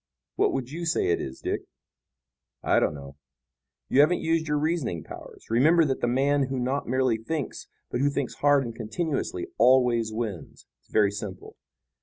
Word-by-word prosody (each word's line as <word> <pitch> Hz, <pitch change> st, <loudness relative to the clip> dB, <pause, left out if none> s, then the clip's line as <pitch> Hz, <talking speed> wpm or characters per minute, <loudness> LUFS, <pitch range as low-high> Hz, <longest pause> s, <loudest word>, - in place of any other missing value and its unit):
What -, -, +2 dB
would 130 Hz, -1 st, -3 dB
you 170 Hz, +2 st, -4 dB
say 165 Hz, -, +1 dB
it 85 Hz, -, +1 dB
is, 65 Hz, 0 st, -7 dB
Dick?" -, -, -2 dB, 1.0 s
"I -, -, +3 dB
don't 75 Hz, -, 0 dB
know." 70 Hz, -1 st, -11 dB, 0.7 s
"You 135 Hz, -, +2 dB
haven't 155 Hz, +5 st, +5 dB
used 160 Hz, 0 st, 0 dB
your 150 Hz, 0 st, +1 dB
reasoning 145 Hz, -, -1 dB
powers. -, -, -11 dB
Remember 155 Hz, +8 st, +5 dB
that 135 Hz, -2 st, -1 dB
the -, -, +1 dB
man 135 Hz, +2 st, +2 dB
who 135 Hz, 0 st, -3 dB
not 130 Hz, +3 st, -1 dB
merely 130 Hz, -2 st, +1 dB
thinks, 140 Hz, +5 st, -4 dB, 0.2 s
but 120 Hz, -, -1 dB
who 140 Hz, -, +3 dB
thinks 140 Hz, -2 st, -2 dB
hard 145 Hz, -2 st, +3 dB
and 115 Hz, -, -5 dB
continuously 155 Hz, -, -3 dB
always 125 Hz, -3 st, +4 dB
wins. 110 Hz, -6 st, -5 dB, 0.2 s
It's -, -, -36 dB
very 105 Hz, -2 st, +3 dB
simple. 100 Hz, -2 st, -7 dB
130 Hz, 175 wpm, -26 LUFS, 110-150 Hz, 1.0 s, haven't